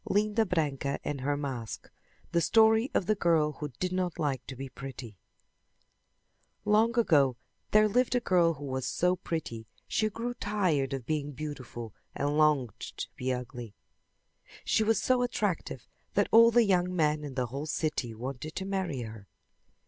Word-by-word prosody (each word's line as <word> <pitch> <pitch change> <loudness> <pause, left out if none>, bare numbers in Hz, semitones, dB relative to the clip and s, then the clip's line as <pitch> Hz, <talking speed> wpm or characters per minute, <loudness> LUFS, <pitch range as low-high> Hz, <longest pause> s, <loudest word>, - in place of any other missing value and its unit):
LINDA 215 +2 +2
BRANCA 145 -5 -1
AND 145 -2 -3
HER 145 +2 0
MASK 130 -6 -5 0.4
The 170 -1 +2
Story 220 +5 +4
of 185 - +2
the 215 - +3
Girl 165 -6 +2
Who 150 - -3
Did 185 0 -1
Not 180 -2 -1
Like 135 -4 -1
To 130 - -6
Be 135 +2 -6
Pretty 130 -6 -9 1.5
Long 220 +3 +3
ago 140 - +4 0.3
there 215 0 +5
lived 250 +4 +2
a - - +4
girl 175 -7 +3
who 145 - -8
was 130 -1 -3
so 180 +1 +2
pretty 120 -11 -5 0.2
she 215 -1 +1
grew 230 +3 -4
tired 180 - 0
of 135 -3 -4
being 145 0 -2
beautiful 130 -6 -7 0.2
and 145 +1 0
longed 150 -7 +2
to - - -6
be 130 +1 -2
ugly. 125 -3 -6 0.9
She 220 - +3
was 220 -1 +2
so 255 -1 +2
attractive 215 -7 -2 0.3
that - - +3
all 230 +1 +8
the 235 0 +5
young 180 -2 +2
men 150 -2 +1
in 140 -3 -6
the 125 -2 0
whole 145 +3 -4
city 150 -8 -2
wanted 135 +6 -6
to 190 - -3
marry 190 -9 -2
her. 110 -3 -8
155 Hz, 165 wpm, -29 LUFS, 135-200 Hz, 1.5 s, all